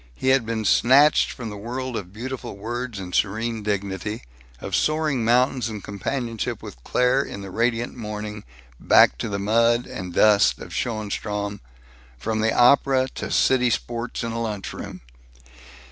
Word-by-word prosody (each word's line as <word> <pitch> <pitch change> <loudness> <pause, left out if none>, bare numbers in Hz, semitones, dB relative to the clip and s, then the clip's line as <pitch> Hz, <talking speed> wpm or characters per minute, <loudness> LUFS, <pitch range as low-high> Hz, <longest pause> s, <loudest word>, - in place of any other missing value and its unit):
He 130 - -1
had 130 -4 +3
been 110 -1 -2
snatched 140 +9 +5
from 115 -4 -6
the 105 - -7
world 125 +4 -5
of 95 -4 -5
beautiful 120 0 -6
words 120 +2 -4
and 90 -2 -7
serene 110 +2 0
dignity, 100 +1 -3 0.4
of 95 +4 -3
soaring 155 -5 +1
mountains 125 +1 +2
and 105 -3 -7
companionship 115 +3 -4
with - - -10
Claire 125 +2 +2
in 100 - -7
the 100 -1 -8
radiant 115 +2 0
morning, 105 -2 -6 0.4
back - - +5
to 115 - -3
the 100 - -2
mud 115 +4 +2
and 90 -2 -7
dust 100 -13 +5
of - - -10
Schoenstrom, 105 -2 -3 0.6
from 110 - -2
the 110 +1 +2
opera 130 +1 +4
to - - -5
"city 125 -2 +3
sports" 120 +1 -3
in 115 - -3
a 115 +1 -3
lunch 105 -4 -4
room! - - -8
115 Hz, 160 wpm, -23 LUFS, 105-125 Hz, 0.6 s, snatched